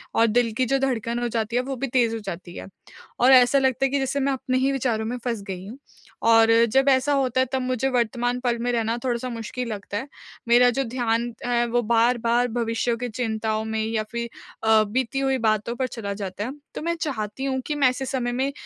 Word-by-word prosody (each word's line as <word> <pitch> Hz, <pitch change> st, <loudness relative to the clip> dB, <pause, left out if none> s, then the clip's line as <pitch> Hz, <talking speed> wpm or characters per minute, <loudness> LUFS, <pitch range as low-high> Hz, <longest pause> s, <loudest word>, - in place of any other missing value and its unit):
और 230 Hz, -, +4 dB
दिल 230 Hz, +1 st, +2 dB
की 255 Hz, -, +2 dB
जो 270 Hz, +3 st, +1 dB
धड़कन 240 Hz, -3 st, -1 dB
हो 240 Hz, -, -1 dB
जाती 225 Hz, 0 st, -2 dB
है, 250 Hz, -, +3 dB
वो 270 Hz, +1 st, -4 dB
भी 270 Hz, +2 st, -3 dB
तेज़ 235 Hz, -2 st, +2 dB
हो -, -, -4 dB
जाती 175 Hz, -2 st, -7 dB
है -, -, -7 dB, 0.5 s
और 250 Hz, +2 st, +5 dB
ऐसा 250 Hz, +2 st, +6 dB
लगता 265 Hz, 0 st, +1 dB
है -, -, +1 dB
कि 280 Hz, -, +1 dB
जैसे 270 Hz, +1 st, -1 dB
मैं 275 Hz, 0 st, +1 dB
अपने 255 Hz, 0 st, -1 dB
ही 265 Hz, +1 st, +2 dB
विचारों 235 Hz, -5 st, -1 dB
में 245 Hz, +2 st, -3 dB
फँस 230 Hz, -4 st, -2 dB
गई 185 Hz, -1 st, -6 dB
हूँ 235 Hz, -, -9 dB, 0.5 s
और 225 Hz, 0 st, +6 dB, 0.2 s
जब 270 Hz, +2 st, +4 dB
ऐसा 265 Hz, +2 st, +3 dB
होता 260 Hz, -2 st, +1 dB
है, -, -, +2 dB
तब 265 Hz, -, +1 dB
मुझे 255 Hz, +1 st, 0 dB
वर्तमान 245 Hz, 0 st, 0 dB
पल 240 Hz, -2 st, 0 dB
में 245 Hz, +1 st, 0 dB
रहना 230 Hz, 0 st, 0 dB
थोड़ा-सा 250 Hz, 0 st, -2 dB
मुश्किल 235 Hz, +1 st, -5 dB
लगता 205 Hz, -1 st, -5 dB
है। 260 Hz, +7 st, -5 dB, 0.4 s
मेरा 245 Hz, +1 st, +6 dB
जो 270 Hz, +3 st, 0 dB
ध्यान 235 Hz, -1 st, -1 dB
है, 240 Hz, -1 st, +1 dB
वो 240 Hz, +1 st, +1 dB
बार-बार 235 Hz, +1 st, +2 dB
भविष्य 230 Hz, 0 st, -1 dB
की 245 Hz, -, -2 dB
चिंताओं 220 Hz, -1 st, -2 dB
में 220 Hz, 0 st, -2 dB
या 220 Hz, -1 st, -1 dB
फिर 235 Hz, 0 st, -3 dB, 0.3 s
अ, 220 Hz, -1 st, +5 dB
बीती 255 Hz, +5 st, -2 dB
हुई 270 Hz, -1 st, +1 dB
बातों 215 Hz, +2 st, 0 dB
पर 260 Hz, +1 st, -1 dB
चला 210 Hz, -5 st, -5 dB
जाता 200 Hz, 0 st, -5 dB
है। 250 Hz, -, -4 dB, 0.2 s
तो -, -, -4 dB
मैं 340 Hz, +2 st, -1 dB
चाहती 260 Hz, -2 st, -3 dB
हूँ 265 Hz, -1 st, -1 dB
कि 300 Hz, -, -1 dB
मैं 280 Hz, -3 st, +4 dB
ऐसे 260 Hz, +1 st, -4 dB
समय 255 Hz, -2 st, -2 dB
में 265 Hz, +3 st, -1 dB
240 Hz, 230 wpm, -24 LUFS, 225-260 Hz, 0.5 s, ऐसा